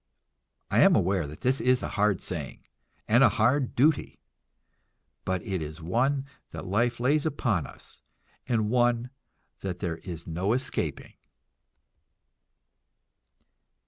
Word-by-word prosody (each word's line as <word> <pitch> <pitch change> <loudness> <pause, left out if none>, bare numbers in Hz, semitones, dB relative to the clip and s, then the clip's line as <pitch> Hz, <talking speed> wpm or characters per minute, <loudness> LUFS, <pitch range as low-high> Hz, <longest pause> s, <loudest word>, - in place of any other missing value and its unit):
I - - +4
am - - +6
aware 90 -3 +1
that 75 +2 -11
this 130 +2 +1
is 125 +1 +2
a - - -3
hard 105 -3 +1
saying, 75 -8 -6 0.4
and - - +5
a - - +7
hard 125 +4 +1
duty, 145 +3 +2 1.1
but 95 -1 -1
it 95 -5 -3
is 75 +2 -6
one 130 - 0 0.2
that - - -8
life 115 +6 0
lays 145 +5 +2
upon 155 -3 0
us, - - -14 0.5
and 110 -4 0
one 120 0 +2 0.5
that 95 -2 -4
there 85 -3 -3
is 85 -1 -8
no 90 +6 -1
escaping. 130 +2 -3
110 Hz, 125 wpm, -27 LUFS, 90-125 Hz, 1.1 s, a